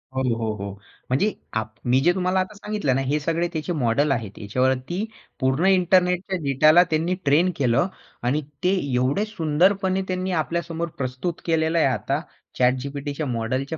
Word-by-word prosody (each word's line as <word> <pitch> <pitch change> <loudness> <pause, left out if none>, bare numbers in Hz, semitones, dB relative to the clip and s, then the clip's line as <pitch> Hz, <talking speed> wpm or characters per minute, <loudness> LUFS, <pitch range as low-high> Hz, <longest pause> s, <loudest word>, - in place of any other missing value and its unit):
हो, 130 - 0 0.2
हो, 110 -1 -1
हो. 100 -1 -5 0.4
म्हणजे 150 +12 +2 0.3
आप 110 0 -6
मी 125 +2 +4
जे 175 +5 +4
तुम्हाला 185 0 +1
आता 185 +3 -2
सांगितलं 205 -10 -1
ना 135 - +1
हे 145 +3 +1
सगळे 165 +3 0
त्याचे 160 +2 -2
मॉडेल 140 +1 +1
आहेत. 110 -6 -3
याच्यावरती 130 - 0 0.4
पूर्ण 130 +6 +1
इंटरनेटच्या 180 0 +3
डेटाला 155 +5 +5
त्यांनी 165 +4 +1
ट्रेन 160 +6 +4
केलं 130 +6 +2 0.4
आणि 135 +5 +1 0.2
ते 185 +2 +3 0.2
एवढे 130 +12 +1
सुंदरपणे 190 +1 +1
त्यांनी 185 0 -2
आपल्यासमोर 170 0 -3
प्रस्तुत 130 +6 -3
केलेलं 160 0 +1
आहे 160 - +4
आता 135 +3 -1 0.4
ChatGPTच्या 140 +4 0
मॉडेलच्या 130 +7 -2
155 Hz, 155 wpm, -23 LUFS, 130-180 Hz, 0.4 s, डेटाला